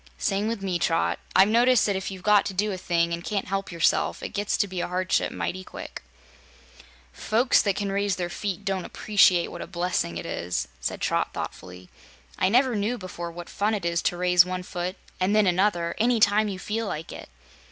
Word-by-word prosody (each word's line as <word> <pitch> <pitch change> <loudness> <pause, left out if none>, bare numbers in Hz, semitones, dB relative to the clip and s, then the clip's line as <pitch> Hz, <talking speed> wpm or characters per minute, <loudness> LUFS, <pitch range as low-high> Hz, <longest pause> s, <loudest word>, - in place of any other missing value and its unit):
"Same 195 - 0
with 225 -3 -3
me, 180 -3 -1
Trot. 165 -1 +1 0.2
I've 190 +1 +7
noticed 240 +2 +4
that 200 - 0
if 190 0 -3
you've 190 -2 -9
got 210 -1 +5
to 195 - -5
do 210 +3 +1
a 190 - -3
thing, 170 -1 0
and 170 0 -4
can't 200 0 -2
help 195 0 -2
yourself, 170 -1 +1
it - - -3
gets 205 0 -1
to 205 - +1
be 185 -2 -4
a - - -2
hardship 185 +1 0
mighty 185 +1 -4
quick." - - -9 1.1
"Folks 235 +4 +2
that 200 -3 0
can 200 -1 -2
raise 200 -1 0
their 175 -1 -2
feet 200 +2 -4
don't 195 -2 -1
appreciate 190 -4 +3
what - - -7
a - - -6
blessing 175 - -2
it 85 - -6
is," 85 -8 -3
said - - -4
Trot - - 0
thoughtfully. 90 0 -7 0.5
"I 185 - +3
never 250 +2 +3
knew 215 +4 -1
before 175 -3 -6
what 175 0 -9
fun 210 +2 0
it 195 -4 -5
is 170 0 0
to 175 - -1
raise 180 -1 +5
one 180 0 -4
foot, 180 +1 -4 0.2
an' 185 +2 +1
then 215 -1 +4
another, 180 -2 +1
any 235 +1 +3
time 210 +1 +4
you 195 -2 -4
feel 220 +3 -3
like 165 -2 -5
it." - - -10
190 Hz, 215 wpm, -25 LUFS, 175-205 Hz, 1.1 s, I've